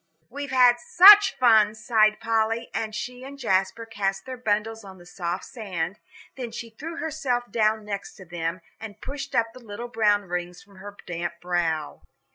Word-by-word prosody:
"We've 285 +1 -6
had 250 -2 +5
such 415 -3 +8
fun," 220 -4 +4
sighed 215 -1 +2
Polly, 225 +1 -1
and 215 -1 -3
she 245 +4 -6
and 275 +1 -10
Jasper 195 0 0
cast 195 -3 -3
their 260 - -6
bundles 225 -1 -2
on 190 -1 -12
the 175 - -16
soft 180 0 -5
sand; 195 -6 -5 0.4
then 245 -3 -6
she 230 0 -8
threw 320 +9 -8
herself 275 -8 -2
down 215 -1 +1
next 200 -1 -6
to 190 - -13
them, 170 +1 -4 0.2
and 220 -2 -9
pushed 280 +1 -7
up 230 0 +1
the 255 0 -14
little 230 +3 -7
brown 210 -3 +2
rings 180 -1 -5
from 200 -1 -20
her 205 +1 -11
damp 170 -1 -4
brow. 170 -4 -2
215 Hz, 175 wpm, -25 LUFS, 195-245 Hz, 0.4 s, such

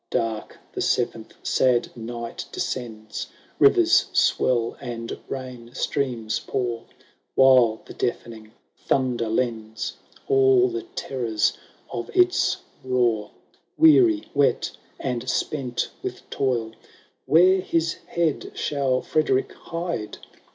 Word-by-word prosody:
Dark 110 -2 -2 0.2
the - - -3
seventh - - -1
sad 125 -2 +2
night 115 0 -6
descends; 110 -4 -4 0.3
Fivers 370 -3 +5
swell, 120 -2 +2
and 115 -3 -5
rain 125 -2 -7
streams 120 -8 -1
pour; 120 -3 -3 0.5
While 125 -4 +5
the - - -10
deafening 110 -2 -4 0.2
thunder 125 -4 0
lends 110 -1 -2 0.3
All 395 -2 +5
the 360 +1 -3
terrors 115 -5 0 0.4
of 120 - -4
its 365 +1 +3 0.3
roar. 120 -5 +1 0.5
Weary, 325 0 +6
wet, 140 -2 +2 0.3
and 125 -1 -3
spent 130 -4 -1
with - - -6
toil, 120 -5 0 0.6
Where 185 +4 +6
his 165 -2 0
head 170 -4 -1
shall 135 -3 0
Frederick 135 -4 +1
hide? 165 -10 -5
130 Hz, 100 wpm, -24 LUFS, 115-160 Hz, 0.6 s, Weary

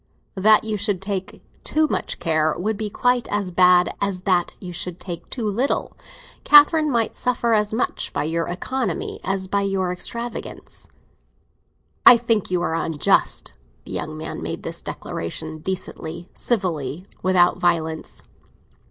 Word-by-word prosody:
"That 210 +2 +5
you 215 -1 -2
should 205 -2 0
take 195 0 -5 0.2
too 310 0 +2
much - - -2
care 155 -1 +1
would 215 +5 -1
be 215 0 -3
quite 245 +3 +1
as 205 -3 -2
bad 180 0 +5
as 200 -2 -1
that 185 -2 +1
you 180 -2 -7
should 180 +1 -4
take 175 -3 -7
too 240 -4 -4
little. 240 +7 -1 0.5
Catherine 300 +1 +7
might 230 -4 0
suffer 240 -2 0
as 210 -1 +2
much 225 +3 -1
by 145 - -1
your 165 +2 -1
economy 255 +8 -3
as 190 0 -2
by 200 +1 0
your 195 -2 0
extravagance." 235 +6 -6 1.2
"I 245 - +10
think 230 -3 0
you 180 -1 0
are 165 -1 -1
very 165 - -1
unjust!" 160 -3 +1 0.3
The - - -10
young 155 +1 -4
man 160 +1 -6
made - - -5
this - - -4
declaration 155 - -5
decently, 170 -1 -5
civilly, 175 - -2 0.2
without 185 -1 +3
violence. 160 -2 -1
190 Hz, 150 wpm, -22 LUFS, 170-220 Hz, 1.2 s, I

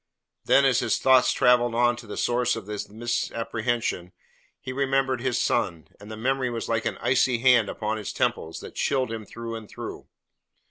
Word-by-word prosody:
Then, 140 - +5
as 130 -2 +3
his 120 - +1
thoughts 130 -1 +4
travelled 120 -1 +3
on 120 0 +3
to 115 - -11
the 105 - -7
source 120 0 +1
of 115 -3 -7
the 105 0 -4
misapprehension 115 -3 -2 0.5
he 130 - -6
remembered 135 -2 0
his 125 -1 0
son, 85 -10 -1
and 105 +1 -12
the 110 - -7
memory 130 +2 0
was 115 -1 -4
like 115 -1 -1
an - - -2
icy 125 -1 +2
hand 120 -3 +4
upon 110 0 -3
his 105 - -5
temples 80 0 -2
that - - -10
chilled 130 -4 0
him 110 -2 -6
through 115 0 -7
and 110 -2 -8
through. - - -8
120 Hz, 185 wpm, -25 LUFS, 110-125 Hz, 0.5 s, Then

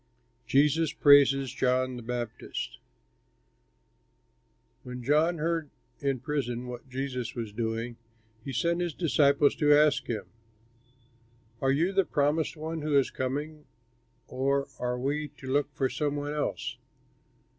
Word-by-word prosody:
JESUS 150 +3 +3
PRAISES 140 -2 +5
JOHN 130 0 +1
THE 120 - -7
BAPTIST 120 -1 -5 2.0
When 125 0 -8
John 155 +6 +3
heard 165 -1 -1 0.3
in 140 -2 0
prison 125 -3 -2
what 125 +1 -8
Jesus 125 -2 -4
was 115 -4 -5
doing, 115 +1 -3 0.5
he 135 - -5
sent 170 +6 0
his 175 -4 -2
disciples 145 -2 +3
to 150 -1 +3
ask 150 -1 +3
him, 110 -3 -3 1.4
"Are 135 - +3
you 165 +8 +1
the 195 0 +4
Promised 150 0 0
One 160 +1 -4
who 150 -1 +2
is 135 - +2
coming, 145 +4 -4 0.6
or 140 +1 0
are 125 0 -1
we 145 +4 -1
to - - -12
look 145 0 +1
for 135 - +1
some 145 +1 -2
one 145 0 -3
else?" 150 - -3
140 Hz, 130 wpm, -28 LUFS, 125-150 Hz, 2.0 s, PRAISES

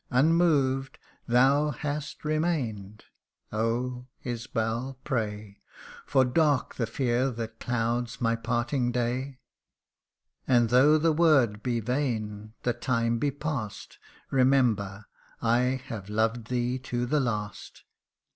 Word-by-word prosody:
Unmoved 135 -2 +2 0.3
thou 135 +5 +4
hast 150 +2 -5
remained 130 - -2 0.5
Oh, 125 +3 -2 0.2
Isbal, 120 +1 -3
pray; 105 -6 -3 0.5
For 130 -1 +4
dark 145 +1 +2
the 115 - -2
fear 125 +2 0
that 115 -2 -6
clouds 120 0 -1
my 115 -1 +1
parting 120 +2 -1
day. 125 +3 -2 1.1
And 120 -3 +3
though 140 +5 +6
the 160 +1 +2
word 140 -10 +3
be 120 -1 -1
vain 110 -4 -2
the 120 - +1
time 115 -1 0
be 145 - +1
pass'd, 140 -6 -5 0.3
Remember 120 -7 +2 0.3
I 125 +3 +2
have 105 -5 -7
loved 110 +2 0
thee 125 +1 -1
to 125 -1 -2
the 150 +5 +1
last 105 -7 -4
125 Hz, 110 wpm, -28 LUFS, 115-135 Hz, 1.1 s, though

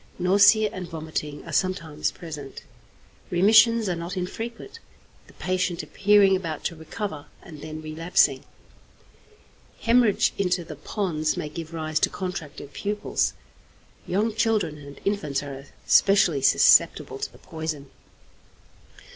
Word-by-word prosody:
Nausea 205 +3 +5
and 180 -2 -6
vomiting 155 -2 -5
are - - -8
sometimes 165 -5 -1
present. 150 -5 -9 0.7
Remissions 220 +5 +5
are 180 - 0
not 170 +3 -6
infrequent, 230 - -6 0.5
the - - -18
patient 185 -1 -2
appearing 200 -1 +4
about 165 -5 -4
to 170 - -3
recover 160 -1 -6 0.2
and 155 -4 -11
then 155 0 -7
relapsing. 155 -3 +1 1.4
Hæmorrhage 230 -3 +3
into 180 -2 +1
the 160 -2 -9
pons 155 -1 -2
may 150 - -4
give 160 +1 -7
rise 155 -1 -2
to - - +2
contracted 165 -7 -6
pupils. 210 0 -1 0.7
Young 210 +5 0
children 210 -9 0
and 140 0 -12
infants 150 -9 -1
are 140 0 -8 0.2
specially 190 -8 +4
susceptible - - +4
to - - -4
the - - -17
poison. 155 -4 -6
175 Hz, 120 wpm, -25 LUFS, 155-200 Hz, 1.4 s, Nausea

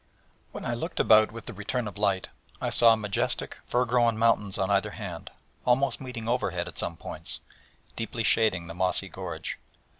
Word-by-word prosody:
When - - -7
I - - -1
looked - - -4
about 110 0 +6
with 115 0 -9
the 120 - -7
return 105 +4 -3
of 105 - -7
light 100 -3 +1 0.3
I - - -2
saw 115 -1 +7
majestic 105 -3 -1
fir 125 +1 +2
grown 120 -2 +2
mountains 110 -3 +2
on 95 +1 0
either 100 +1 +2
hand, 95 -6 -7 0.3
almost 130 +3 +2
meeting 125 -4 -6
overhead 125 +2 -1
at - - -4
some - - -2
points, - - -5 0.6
deeply 115 0 -3
shading 110 -7 +3
the 85 - -8
mossy 95 +2 +1
gorge. 85 -5 -5
110 Hz, 175 wpm, -27 LUFS, 95-115 Hz, 0.6 s, saw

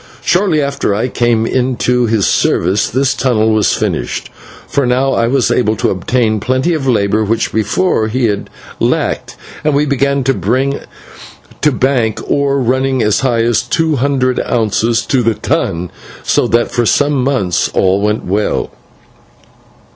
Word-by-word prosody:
Shortly 175 -5 +2
after 140 -7 -1
I 115 +5 -1
came 120 -2 +1
into 125 -1 0
his 110 -4 +1
service 95 +6 +1
this 135 +1 +1
tunnel 110 -5 +1
was 110 -1 +2
finished, - - -3 0.4
for 140 -3 0
now 130 +2 +1
I 115 - +1
was 130 0 +1
able 110 -3 +1
to - - 0
obtain 110 +3 0
plenty 130 - 0
of 145 -4 -2
labour, 110 -3 +1
which 110 +2 -1
before 110 - 0
he 120 +3 0
had 105 -3 -2 0.3
lacked, - - -1 0.3
and 150 -2 +1
we 145 +1 +2
began 140 0 0
to 135 - +2
bring 130 +8 -1 0.8
to 150 - +3
bank 125 -5 0
ore 140 -1 +1
running 130 0 0
as 105 -1 +2
high 120 -4 +1
as 115 -2 +2
two 160 -3 0
hundred 130 -1 0
ounces 115 0 0
to 130 -3 +1
the 115 -2 +1
ton, 85 -2 -2 0.3
so - - +1
that 120 0 +1
for 120 -2 0
some 145 0 +2
months 125 -10 0
all 95 +1 +1
went 105 +1 -1
well. 100 +3 -1
125 Hz, 155 wpm, -14 LUFS, 110-135 Hz, 0.8 s, to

